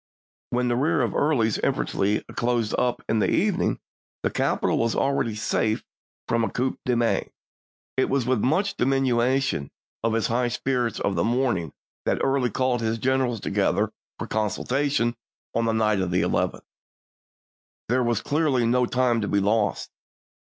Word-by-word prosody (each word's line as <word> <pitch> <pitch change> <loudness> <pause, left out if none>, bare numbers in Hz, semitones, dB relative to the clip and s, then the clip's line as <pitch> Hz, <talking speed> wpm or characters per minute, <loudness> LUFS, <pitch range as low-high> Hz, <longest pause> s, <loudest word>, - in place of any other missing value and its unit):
When 125 0 0
the 120 - +1
rear 145 +2 +2
of 115 - -1
Early's 120 -8 +2
infantry 100 +2 0
closed 120 -2 0
up 125 -1 0
in 110 - +1
the - - +2
evening, - - +1 0.4
the - - +1
capital - - +1
was 115 -1 +1
already 135 -5 0
safe 110 0 0 0.4
from 115 0 +1
a - - 0
coup 130 +2 -2
de 125 - +2
main. 115 -1 +1 0.7
It 130 - +2
was 135 -3 +1
with 125 -2 +1
much 185 - +1
diminution 130 - +1 0.3
of 115 -1 +1
his 115 -1 +1
high 120 +1 +1
spirits 120 -2 -1
of 100 - 0
the 85 -2 0
morning 120 - 0 0.4
that - - +2
Early 135 -2 +2
called 125 +1 0
his 115 0 0
generals 130 -3 0
to - - -4
gether - - +1 0.2
for - - -4
consultation 120 +3 0 0.4
on 115 - +1
the 115 - +2
night 110 -2 +2
of 95 - -1
the 90 +1 +1
11th. - - -1 1.2
There 125 +3 +2
was 120 -3 +1
clearly 145 -5 +1
no 125 +1 +2
time 125 -2 +1
to 105 - -2
be 100 - +2
lost. 105 +1 0
120 Hz, 165 wpm, -25 LUFS, 110-130 Hz, 1.2 s, rear